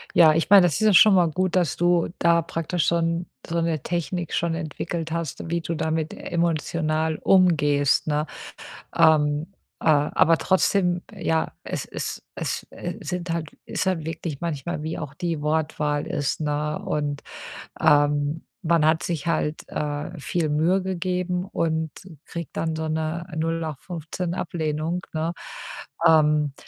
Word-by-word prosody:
Ja, 160 -3 +7
ich 165 +1 +1
meine, 200 -1 +10
das 165 - -1
ist - - -2
ja 215 - +5
schon 205 +2 +8
mal 175 -2 +5
gut, 185 +2 0
dass 175 -6 +2
du 175 -1 +2
da 170 -1 +4
praktisch 165 +1 -2
schon 170 0 +1 0.2
so 170 - -2
'ne 165 -3 0
Technik 175 0 -3
schon 170 -1 0
entwickelt 165 +1 -4
hast, 165 -1 -4
wie 170 - 0
du 165 - -3
damit 160 -1 -1
emotional 160 -1 -1
umgehst, 150 -7 +3
ne? 150 0 0 0.7
Ähm, 150 +2 +3 0.3
äh, - - -7
aber 155 +2 +4
trotzdem, 180 -2 +2
ja, 160 -5 -1
es - - -4
es - - -5
es, - - -3
äh, - - -6
sind 180 -1 -4
halt 165 -3 -3 0.2
ist - - -2
halt 180 -4 0
wirklich 160 -3 -5
manchmal 155 -1 -3
wie 160 +1 -3
auch 145 -2 -6
die 165 -2 -3
Wortwahl 150 -1 0
ist, 145 +1 -2
ne? 150 0 -1
Und, 145 -1 -2 0.6
ähm, 145 +1 +3 0.2
man 165 -3 +3
hat 160 +1 +3
sich 170 -2 -3
halt, 155 -2 0
äh, 150 +3 -4
viel 160 +1 -1
Mühe 165 +6 +2
gegeben 180 -1 -1
und 160 -4 -1 0.3
kriegt 170 -2 -7
dann 160 -1 -1
so 160 0 -3
'ne 160 +2 -2
nullachtfünfzehn 165 +2 -3
Ablehnung, 160 -1 -2
ne? 160 +1 -1 0.8
Ähm, 150 -2 +4
160 Hz, 150 wpm, -24 LUFS, 150-170 Hz, 0.8 s, meine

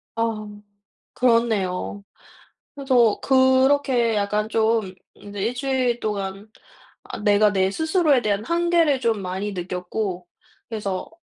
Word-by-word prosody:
아하 225 -2 -2 0.7
그렇네요. 215 -5 0 0.7
그래서 255 -6 +2
그렇게 260 -2 +3
약간 210 +1 -1
좀 220 -3 0 0.2
이제 205 0 -10
1 230 +5 -1
주일 255 -2 0
동안 200 -1 -4 0.5
아 - - -8
내가 210 0 +3
내 190 -1 +1
스스로에 315 - +2
대한 210 -2 -1
한계를 335 -3 +2
좀 225 -4 0
많이 190 +3 -4
느꼈고 180 +1 -4 0.4
그래서 200 -4 -4
220 Hz, 230 characters per minute, -22 LUFS, 200-260 Hz, 0.7 s, 그렇게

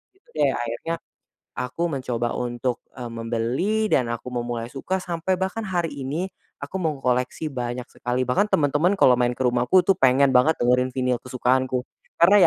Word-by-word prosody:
Gitu 380 - -34
deh, 145 -2 +4
akhirnya, 120 +8 -3 0.6
aku 165 +7 -2
mencoba 125 -4 -2
untuk, 120 0 -2 0.2
eee, 120 - -4
membeli, 120 - -1
dan 125 -3 +3
aku 120 +2 -5
memulai 120 -1 -3
suka 185 +7 -2
sampai 175 +1 -1
bahkan 190 +4 -2
hari 175 -3 0
ini 145 +7 -3 0.3
aku 140 +6 -5
mengkoleksi 135 -1 -1
banyak 125 -1 -3
sekali. 125 +1 -1
Bahkan 200 +12 +2
teman-teman 155 +6 +3
kalau 130 -9 +6
main 120 0 +2
ke 130 - -2
rumahku 125 +9 +3
tuh 195 - +5
pengen 135 +1 +5
banget 130 +5 +4
dengerin 125 +1 +3
vinyl 125 -2 +1
kesukaanku. 130 0 0 0.4
Karena 190 +5 +7
130 Hz, 160 wpm, -24 LUFS, 120-165 Hz, 0.6 s, Karena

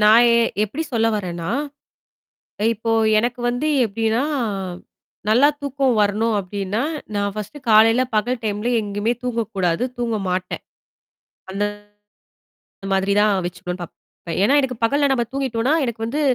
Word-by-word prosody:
நான் 220 +3 +7
எ - - +4 0.3
எப்படி 270 +10 -4
சொல்ல 225 -1 +2
வரேன்னா? 175 -4 -4 1.2
இப்போ 225 +1 -3 0.3
எனக்கு 240 +2 -1
வந்து 245 +5 -1 0.2
எப்டின்னா 225 +3 0 1.1
நல்லா 250 +7 +5
தூக்கம் 275 -2 0
வரணும் 210 +2 +2
அப்டின்னா, 200 +2 -3 0.3
நான் 200 0 0
ஃபர்ஸ்ட்டு 215 +8 -6
காலையில, 225 +3 +6
பகல் 235 +3 0
டைம்ல 210 +3 -1
எங்கேயுமே 205 +2 -1
தூங்கக்கூடாது. 225 -5 -1
தூங்க 230 -2 -1
மாட்டேன். 180 0 -3 0.9
அந்த 200 +2 -1 1.3
மாதிரி 195 +1 +1
தான் 210 0 +4
வச்சுக்கணும்னு 180 0 -5
பார்ப்பேன். 170 - -9 0.3
அ - - -1
ஏன்னா, 280 - +4
எனக்கு 255 -3 -3
பகல்ல 280 +4 +3
நம்ம 240 -3 +1
தூங்கிட்டோம்னா, 265 0 0
எனக்கு 235 -3 -3
வந்து 285 +7 -2
225 Hz, 130 wpm, -21 LUFS, 205-245 Hz, 1.3 s, நான்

